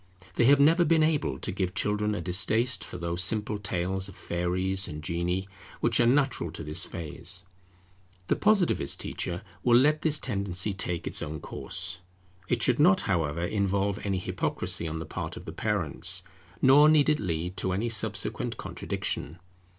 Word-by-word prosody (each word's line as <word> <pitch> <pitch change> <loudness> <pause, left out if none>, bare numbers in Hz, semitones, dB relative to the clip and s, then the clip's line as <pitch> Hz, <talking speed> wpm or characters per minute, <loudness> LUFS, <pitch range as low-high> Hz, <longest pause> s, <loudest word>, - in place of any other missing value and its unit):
They 115 - +2
have 140 +2 +6
never 165 +5 +5
been 160 -1 +3
able 150 - 0
to - - -4
give 90 -1 -3
children 105 0 0
a 90 - -4
distaste 100 +6 +2
for - - -8
those 85 +1 0
simple 105 +1 +2
tales 95 0 -2
of 95 - -13
fairies 90 +2 -1
and 75 0 -7
genii, 85 +3 -2 0.3
which - - +2
are 120 - +4
natural 130 - +1
to - - -7
this 75 0 -1
phase. 85 +3 -6 0.8
The - - +2
Positivist 195 - +2
teacher - - -4 0.2
will 120 -1 +5
let 150 +4 +3
this 155 -2 +4
tendency 100 -6 -1
take 90 -3 -2
its - - -3
own 75 +1 -5
course. 90 +4 -3 0.5
It 120 +1 0
should 125 +1 +2
not, 180 +5 +5
however, 85 -3 -1
involve 100 0 0
any 100 -2 -1
hypocrisy 85 -2 0
on 80 0 -4
the 80 - -5
part - - -5
of - - -10
the 80 - -7
parents, 100 -7 -1 0.4
nor 145 +3 +7
need 155 -2 +4
it 150 -1 +2
lead 90 -1 -3
to 95 +1 0
any 100 +6 -1
subsequent 110 -2 0
contradiction. 75 +4 -4
95 Hz, 170 wpm, -27 LUFS, 85-125 Hz, 0.8 s, nor